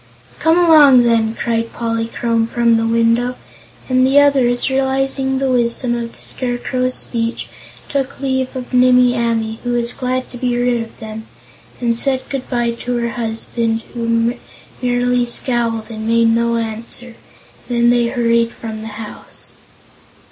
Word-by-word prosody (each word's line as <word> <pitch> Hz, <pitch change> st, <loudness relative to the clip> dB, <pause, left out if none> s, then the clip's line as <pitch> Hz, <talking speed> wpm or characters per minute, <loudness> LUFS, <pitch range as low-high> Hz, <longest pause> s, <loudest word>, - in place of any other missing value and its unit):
"Come 325 Hz, +1 st, +3 dB
along, 300 Hz, -7 st, +7 dB
then!" 230 Hz, -1 st, +2 dB
cried 230 Hz, -1 st, -2 dB
Polychrome 230 Hz, 0 st, -1 dB
from 235 Hz, 0 st, +2 dB
the 225 Hz, 0 st, +1 dB
window, 230 Hz, +2 st, +2 dB, 0.5 s
and 255 Hz, 0 st, +3 dB
the 270 Hz, +2 st, +5 dB
others, 265 Hz, -4 st, +3 dB
realizing 265 Hz, 0 st, 0 dB
the 265 Hz, 0 st, 0 dB
wisdom 240 Hz, 0 st, +1 dB
of 235 Hz, -1 st, -5 dB
the -, -, -12 dB
Scarecrow's 255 Hz, 0 st, -1 dB
speech, 230 Hz, -1 st, -2 dB, 0.4 s
took 275 Hz, -2 st, -3 dB
leave 260 Hz, -1 st, -1 dB
of 255 Hz, 0 st, -7 dB
Nimmie 250 Hz, 0 st, +5 dB
Amee, 225 Hz, -2 st, -1 dB
who 245 Hz, 0 st, -1 dB
was 240 Hz, 0 st, -1 dB
glad 255 Hz, 0 st, -2 dB
to 245 Hz, -, -7 dB
be 245 Hz, -1 st, 0 dB
rid 245 Hz, -1 st, +1 dB
of 225 Hz, -, -9 dB
them, 220 Hz, 0 st, -8 dB, 0.5 s
and 235 Hz, -1 st, 0 dB
said 260 Hz, +2 st, 0 dB
good 270 Hz, -2 st, -4 dB
bye 240 Hz, -2 st, 0 dB
to 245 Hz, 0 st, -2 dB
her 235 Hz, 0 st, -1 dB
husband, 225 Hz, 0 st, -2 dB
who 230 Hz, 0 st, 0 dB, 0.5 s
merely 245 Hz, 0 st, +1 dB
scowled 235 Hz, -2 st, -1 dB
and 220 Hz, 0 st, -5 dB
made 230 Hz, 0 st, +3 dB
no 235 Hz, 0 st, +1 dB
answer, 230 Hz, +2 st, -5 dB, 0.6 s
and 240 Hz, -, -1 dB
then 235 Hz, 0 st, +4 dB
they 240 Hz, -1 st, +2 dB
hurried 235 Hz, -1 st, +1 dB
from 220 Hz, -1 st, -7 dB
the 220 Hz, -, -7 dB
house. 220 Hz, -2 st, -7 dB
240 Hz, 155 wpm, -17 LUFS, 230-255 Hz, 0.6 s, along